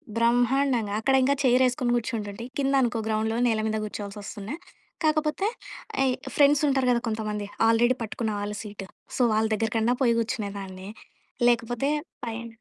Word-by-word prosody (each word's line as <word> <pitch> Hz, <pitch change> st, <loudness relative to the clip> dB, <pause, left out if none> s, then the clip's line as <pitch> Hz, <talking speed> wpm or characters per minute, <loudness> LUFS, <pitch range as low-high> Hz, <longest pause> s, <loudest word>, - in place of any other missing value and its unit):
బ్రహ్మాండంగా. 240 Hz, -1 st, +2 dB
అక్కడింకా 265 Hz, +3 st, +3 dB
చైరేసుకుని 250 Hz, -1 st, +3 dB
కూర్చుంటుంటే, 225 Hz, -2 st, -4 dB
కిందనుకో 270 Hz, -4 st, +2 dB
గ్రౌండ్‌లో 220 Hz, +1 st, 0 dB
నేల 220 Hz, -2 st, +1 dB
మీద 220 Hz, 0 st, -1 dB
గూర్చోవాల్సొస్తుండే, 205 Hz, +3 st, -6 dB, 0.5 s
కాకపోతే 310 Hz, +5 st, +1 dB, 0.5 s
అయి 260 Hz, -1 st, +3 dB, 0.2 s
ఫ్రెండ్సుంటారు 280 Hz, -2 st, +4 dB
గదా 235 Hz, -1 st, +2 dB
కొంతమంది, 210 Hz, -2 st, -3 dB, 0.2 s
ఆల్రెడీ 240 Hz, +3 st, +3 dB
పట్టుకున్న 220 Hz, 0 st, -3 dB
వాళ్ళు 210 Hz, +1 st, -4 dB
సీటు, 205 Hz, -2 st, -8 dB, 0.3 s
సో, -, -, +1 dB
వాళ్ళ 220 Hz, +1 st, +2 dB
దెగ్గర 225 Hz, +1 st, -1 dB
కన్నా 235 Hz, +3 st, +2 dB
పోయి 235 Hz, -2 st, +4 dB
కూర్చునేదాన్ని. 200 Hz, -5 st, -5 dB, 0.6 s
లేకపోతే 240 Hz, +3 st, +1 dB, 0.4 s
పైన 230 Hz, +1 st, -5 dB
230 Hz, 125 wpm, -26 LUFS, 215-260 Hz, 0.6 s, ఫ్రెండ్సుంటారు